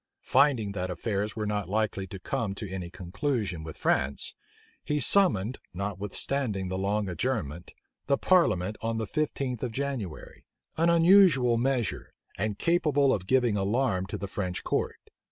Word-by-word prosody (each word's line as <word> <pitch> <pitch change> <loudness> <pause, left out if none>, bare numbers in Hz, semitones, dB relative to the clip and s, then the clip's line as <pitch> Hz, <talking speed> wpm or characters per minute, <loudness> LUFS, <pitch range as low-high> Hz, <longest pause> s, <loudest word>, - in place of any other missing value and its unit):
Finding 130 -7 +3
that 95 -2 -3
affairs 100 +3 -2
were 110 -2 -2
not 105 -3 -2
likely 105 -2 -1
to 95 - -7
come 100 +2 -3
to 105 - -5
any 95 -2 -5
conclusion 95 - -3
with 80 -1 -8
France, 70 +1 0 0.5
he 150 0 0
summoned, 130 - +3 0.2
notwithstanding 100 +2 -1
the 95 - -2
long 100 +1 0
adjournment, 90 - -3 0.3
the 140 -1 +3
parliament 110 - +2
on 115 0 -1
the 110 - -1
fifteenth 135 -1 -2
of 125 - -2
January; 125 - -5 0.3
an 165 +1 +3
unusual 170 -8 +6
measure, 120 -4 -1 0.2
and 105 +1 -2
capable 150 - +2
of 95 -2 -3
giving 125 -2 +3
alarm 100 -1 0
to 105 - -4
the 100 - -5
French 90 -2 -3
court. - - -1
105 Hz, 150 wpm, -28 LUFS, 95-135 Hz, 0.5 s, unusual